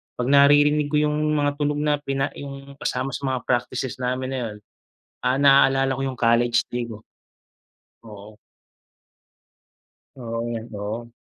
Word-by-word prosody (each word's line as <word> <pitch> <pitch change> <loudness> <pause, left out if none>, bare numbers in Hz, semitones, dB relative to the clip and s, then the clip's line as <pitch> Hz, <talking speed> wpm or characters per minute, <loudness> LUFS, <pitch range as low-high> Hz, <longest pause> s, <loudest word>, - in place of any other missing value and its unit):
pag 125 0 -2
naririnig 145 +1 +5
ko 150 - -2
'yung 150 0 0
mga 145 -1 +1
tunog 145 0 0
na 150 -1 +1
pina 135 -1 -2
'yung 140 0 -10
kasama 130 0 -2
sa 135 +2 -4
mga 130 -2 -2
practices 125 +1 -2
namin 130 +1 -2
na 135 - -2
'yun, 105 - -8 0.7
ah, 125 +1 +2
naalala 135 -1 +4
ko - - -4
'yung 130 - -4
college 115 0 +3
day 120 -1 -3
ko. 110 -2 -10 1.0
Oo. 105 -1 -12 1.8
Oo, 115 -2 -4 0.3
oo. 110 +4 -5
130 Hz, 140 wpm, -23 LUFS, 120-140 Hz, 1.8 s, naririnig